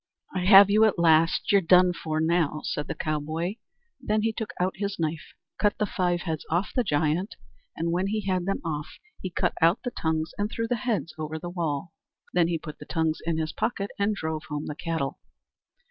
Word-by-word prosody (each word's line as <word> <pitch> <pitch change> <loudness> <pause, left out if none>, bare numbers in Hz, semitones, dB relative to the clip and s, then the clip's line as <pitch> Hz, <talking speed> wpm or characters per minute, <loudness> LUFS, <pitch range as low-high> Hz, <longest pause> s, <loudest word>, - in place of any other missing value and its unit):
"I 185 -1 -1
have 195 0 +9
you 215 +2 +5
at 215 - +2
last; 165 0 +4
you're 200 -1 +5
done 180 +1 +5
for 155 -2 -3
now!" 160 -2 +1
said 150 - -3
the - - -4
cowboy. 155 +6 -2 0.4
Then 215 -3 0
he 225 0 +1
took 220 -1 -4
out 185 +1 0
his 200 0 -3
knife, 160 -1 -3 0.2
cut 205 -1 +2
the 210 - +1
five 180 -3 0
heads 160 -4 -3
off 175 +5 0
the 250 - +3
giant, 160 +3 0 0.4
and 170 +1 -1
when 180 +3 0
he 215 +2 -1
had 185 -2 -1
them 195 - -1
off 150 -2 -3 0.3
he 185 - -3
cut 175 - 0
out 165 +2 +4
the 245 - -2
tongues 160 -4 -1
and 205 +1 0
threw 230 0 -2
the 245 - +1
heads 210 - -2
over 155 0 -3
the 175 +2 -6
wall. 165 -2 -3 0.4
Then 175 -2 +4
he 170 -1 0
put 150 -2 -9
the - - -9
tongues 160 -2 0
in 165 -1 +1
his 155 -1 -2
pocket 210 -2 -2
and 205 +1 +1
drove 160 -3 -4
home 150 0 -3
the - - -4
cattle. 160 -3 -3
170 Hz, 210 wpm, -26 LUFS, 160-200 Hz, 0.4 s, have